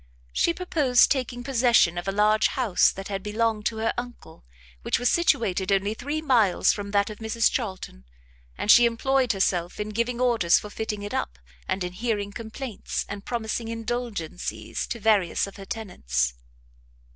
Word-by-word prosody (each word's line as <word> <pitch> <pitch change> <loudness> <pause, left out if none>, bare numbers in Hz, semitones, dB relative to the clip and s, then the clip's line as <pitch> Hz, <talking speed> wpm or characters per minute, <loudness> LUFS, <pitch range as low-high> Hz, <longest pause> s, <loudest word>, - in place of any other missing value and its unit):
She - - +2
purposed 300 -8 +3
taking 250 -3 -1
possession 240 -8 +3
of 175 +2 -5
a - - +1
large 210 +2 +3
house 235 -9 +2
that 195 0 -8
had 195 -1 -3
belonged 215 +1 0
to 225 - -3
her 225 +1 0
uncle, 245 -9 -10 0.4
which - - 0
was 245 0 +1
situated 225 - +1
only 200 +2 +1
three 290 +7 -4
miles 230 - +3
from 205 -1 -6
that 200 +1 +1
of 210 - -10
Mrs 220 0 +1
Charlton; 190 - -5 0.5
and 210 - +3
she 240 0 +8
employed 255 +2 +1
herself 180 -2 -1
in 210 0 -3
giving 235 +3 -2
orders 235 -9 +3
for 210 - -6
fitting 210 -2 -4
it 205 - -6
up, - - -3 0.3
and 190 - -1
in 180 0 -4
hearing 205 -1 -2
complaints, 230 +1 -5
and 200 0 -7
promising 230 -1 -3
indulgencies, 230 -6 -4
to 235 - -5
various 205 -5 +2
of 195 - -11
her 195 - -9
tenants. 65 - -2
220 Hz, 170 wpm, -25 LUFS, 195-240 Hz, 0.5 s, she